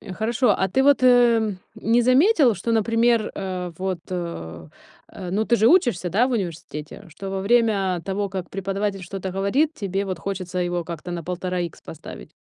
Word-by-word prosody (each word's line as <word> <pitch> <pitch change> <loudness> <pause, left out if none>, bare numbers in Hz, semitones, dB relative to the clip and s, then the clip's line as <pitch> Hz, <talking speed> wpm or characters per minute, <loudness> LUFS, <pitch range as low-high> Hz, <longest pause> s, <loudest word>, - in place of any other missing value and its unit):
Э, 195 - -9
хорошо. 225 +4 +1
А 190 - 0
ты 265 +8 +2
вот, 280 -2 +4
э, 235 -4 +4 0.2
не 235 +2 +2
заметил, 265 - +4
что, 230 +6 -2
например, 230 0 +2
э, 185 -2 -4
вот, 190 -2 -2
э, 170 - -5 0.4
э, 180 -2 -8
ну, 210 +3 0
ты 235 - +3
же 220 - +3
учишься, 240 - +3
да, 220 +9 +2
в - - -3
университете, 165 -7 -5
что 195 +5 -8
во 195 0 -2
время 200 -4 +2
того, 200 +1 -2
как 185 -2 -6
преподаватель 195 0 -3
что-то 190 +1 -5
говорит, 200 - +1
тебе 195 -1 -2
вот 185 -3 -4
хочется 185 0 -4
его 175 -1 -1
как-то 170 +1 -7
на 175 -1 -4
1,5 180 0 -3
икс 170 -2 -5
поставить? 160 0 -10
195 Hz, 185 wpm, -23 LUFS, 180-230 Hz, 0.4 s, вот